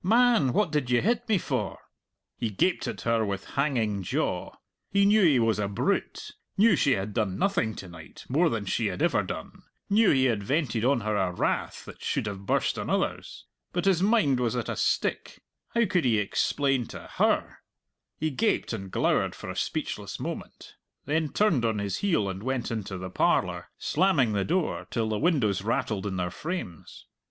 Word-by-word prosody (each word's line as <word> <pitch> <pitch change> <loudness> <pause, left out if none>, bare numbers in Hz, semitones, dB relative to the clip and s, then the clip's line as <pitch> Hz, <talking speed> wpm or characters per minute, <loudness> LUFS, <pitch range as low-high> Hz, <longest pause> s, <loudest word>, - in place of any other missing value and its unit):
Man, 230 - +4
what 190 +3 +1
did 145 -5 0
you 125 -1 +4
hit 240 +2 0
me 215 - +4
for?" - - -2 0.6
He 115 - -2
gaped 110 - 0
at - - -5
her 115 -1 +1
with 100 -2 -4
hanging 120 -8 0
jaw. 90 - -2 0.4
He 200 0 +3
knew 210 +2 +5
he 155 -7 +5
was 115 -3 +2
a 100 - 0
brute 100 - -2 0.3
knew 210 0 +6
she 140 -3 +3
had 100 -1 -3
done 95 -4 -1
nothing 175 - 0
to 95 - -8
night 85 -2 -12
more 160 +6 +3
than 115 -6 -2
she 110 +3 0
had 90 -2 -2
ever - - +3
done - - -7 0.3
knew 215 +1 +5
he 130 -1 +4
had 115 -5 +1
vented 125 -1 0
on 130 -1 +3
her 110 0 -1
a 95 -3 +1
wrath 90 - -2
that - - -12
should - - -1
have 100 -2 -6
burst - - +1
on - - -4
others. - - -2 0.3
But 175 +1 -1
his 190 -3 +3
mind 195 - +3
was 125 0 0
at 120 -3 -2
a - - -2
stick; - - -1 0.3
how 235 0 +4
could 185 -5 +1
he 115 -3 +3
explain 130 +4 +1
to - - -8 0.2
her? - - +1 0.6
He 155 0 0
gaped 210 - 0
and 95 -3 -5
glowered - - +1
for - - -7
a - - -8
speechless - - -3
moment, - - -7 0.3
then 155 +2 0
turned 180 - +2
on 110 -2 +1
his 100 -2 -2
heel 170 - +1
and 95 0 -4
went 130 +1 -2
into 105 -4 -4
the 95 0 -6
parlour, - - +1
slamming 155 - +2
the 100 -1 0
door 175 0 -1
till 115 -2 -1
the 105 -1 -1
windows 130 - +2
rattled 105 -1 -1
in 95 -2 -3
their 90 -1 -2
frames. 150 - -6
125 Hz, 195 wpm, -27 LUFS, 105-170 Hz, 0.6 s, knew